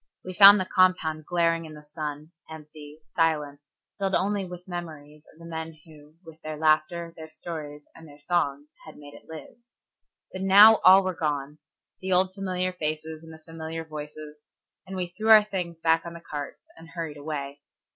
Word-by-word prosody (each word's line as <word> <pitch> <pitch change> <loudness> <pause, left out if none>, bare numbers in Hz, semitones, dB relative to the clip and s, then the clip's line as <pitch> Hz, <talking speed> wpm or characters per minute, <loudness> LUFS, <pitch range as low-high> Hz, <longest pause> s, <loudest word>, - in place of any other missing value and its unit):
We 185 - -6
found 200 +2 +9
the 185 - -1
compound 175 -5 +1
glaring 165 -1 +1
in 155 -1 -11
the 150 - -13
sun, 150 0 -7 0.2
empty, 150 -1 -12 0.2
silent, 150 -4 0 0.4
filled 195 -1 0
only 200 +1 0
with 180 0 -11
memories 155 -4 -9
of - - -24
the 170 - -13
men 160 -1 -6
who, 150 -1 -17
with 160 0 -14
their 155 0 -6
laughter, 160 +2 +1
their 160 0 -10
stories, 155 -2 -8
and 165 - -15
their 145 -1 -15
songs 145 -2 -2
had 155 - -12
made 145 -1 -13
it - - -16
live. 160 -1 -11 0.8
But 190 - -6
now 205 +3 +8
all 190 +1 +6
were 185 0 -2
gone, 150 -2 -3 0.4
the 190 0 -2
old 185 +1 +2
familiar 185 -2 -3
faces 155 -1 -4
and 160 - -12
the 160 - -11
familiar 165 0 -7
voices, 150 0 -9 0.5
and 190 - -7
we 185 -1 -2
threw 220 +1 -2
our 215 -1 +9
things 180 -5 -5
back 165 0 +2
on 170 - -8
the - - -9
carts 145 -4 -8
and 165 0 -15
hurried 165 -3 -6
away. 145 -1 -6
160 Hz, 185 wpm, -26 LUFS, 150-180 Hz, 0.8 s, found